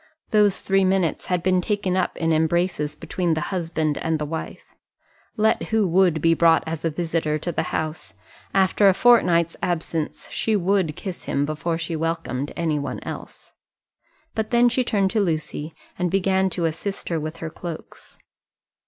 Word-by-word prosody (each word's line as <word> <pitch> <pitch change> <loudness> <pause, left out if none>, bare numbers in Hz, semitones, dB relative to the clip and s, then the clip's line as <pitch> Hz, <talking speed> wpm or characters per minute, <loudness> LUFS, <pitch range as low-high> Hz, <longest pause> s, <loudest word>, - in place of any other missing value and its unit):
Those 210 -3 +3
three 195 0 +3
minutes 185 -4 +1
had 180 -2 0
been 185 -1 +3
taken 200 -2 -1
up 185 -1 0
in 165 -1 +1
embraces 160 -1 +1
between 175 +1 -1
the - - -1
husband 160 -4 -1
and 160 -1 0
the 150 - -3
wife. 160 +2 -6 0.7
Let 220 +1 +2
who 220 -3 +2
would 175 -3 +3
be 165 0 +5
brought 165 0 +4
as 160 -1 -4
a 165 - +1
visitor 160 -1 -1
to 175 +3 -3
the - - -1
house, 155 0 -4 0.4
after 195 +1 +4
a 190 - +3
fortnight's 175 -9 +4
absence, 165 -2 -2
she 220 - 0
would 190 -4 +1
kiss 190 -3 -7
him 140 - 0
before 165 +2 -2
she 165 0 -3
welcomed 160 -4 -2
any 160 -3 0
one 140 - -4
else. - - -9 0.8
But 220 -1 -2
then 240 0 +5
she 250 +1 +1
turned 200 -5 +1
to 220 - +1
Lucy, 155 -3 -2 0.2
and 180 0 +1
began 190 +1 +2
to 175 -2 -1
assist 195 +5 -3
her 165 -2 0
with 155 +2 -5
her 160 -1 -6
cloaks. 170 0 -9
170 Hz, 170 wpm, -23 LUFS, 160-190 Hz, 0.8 s, be